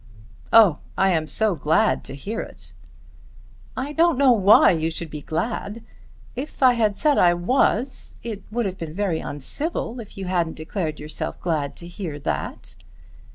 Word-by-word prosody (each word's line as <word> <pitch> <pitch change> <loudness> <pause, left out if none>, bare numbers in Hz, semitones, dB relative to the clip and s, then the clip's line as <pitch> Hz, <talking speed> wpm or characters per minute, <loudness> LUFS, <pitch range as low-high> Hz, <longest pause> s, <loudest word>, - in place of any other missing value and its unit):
"Oh! 210 -9 +6 0.2
I 190 0 +3
am 160 -3 0
so 220 +3 +2
glad 160 +7 +1
to 135 - -7
hear 205 +11 -4
it." - - -12 1.0
"I 275 +3 -3
don't 330 -2 +3
know 275 -1 +5
why 205 -3 +6
you 160 -2 0
should 165 -1 -6
be 150 - -6
glad. 205 +7 -3 0.5
If 270 +2 -5
I 255 -1 +7
had 215 -4 +1
said 300 -2 +3
I 175 -1 +5
was, 245 +6 0
it 220 -4 -5
would 235 +2 -1
have 190 -1 -4
been 160 -1 -6
very 190 -5 0
uncivil 240 - -4
if 215 -4 -11
you 195 - -5
hadn't 175 -3 -1
declared 155 -1 -4
yourself 150 +1 -5
glad 155 -5 -2
to 170 - -9
hear 175 -4 -6
that." 75 - -5
190 Hz, 165 wpm, -23 LUFS, 160-230 Hz, 1.0 s, I